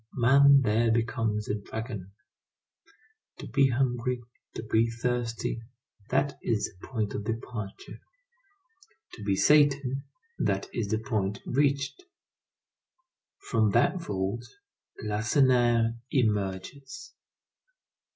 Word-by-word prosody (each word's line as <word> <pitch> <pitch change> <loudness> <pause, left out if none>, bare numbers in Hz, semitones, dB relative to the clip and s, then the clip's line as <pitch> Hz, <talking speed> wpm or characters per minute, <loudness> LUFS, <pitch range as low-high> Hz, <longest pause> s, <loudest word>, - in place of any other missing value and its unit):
Man 140 +3 +6
there 115 +1 +2
becomes 115 -2 0
a - - -1
dragon. 105 -2 -6 1.3
To - - -8
be 135 +3 +3
hungry, 125 -1 0 0.3
to - - -5
be 115 +1 +2
thirsty—that 120 +2 -3
is 110 -2 -1
the - - -10
point 110 -5 -2
of 105 - -4
departure; 110 -2 -6 1.1
to 105 - -9
be 100 -1 +1
Satan—that 145 - +1
is 110 -4 -2
the 110 - 0
point 105 -4 -2
reached. 140 - 0 1.5
From 110 -3 +2
that 145 +10 +3
vault 100 - -3 0.6
Lacenaire 115 +1 +2
emerges. 110 +3 -2
115 Hz, 95 wpm, -28 LUFS, 110-135 Hz, 1.5 s, Man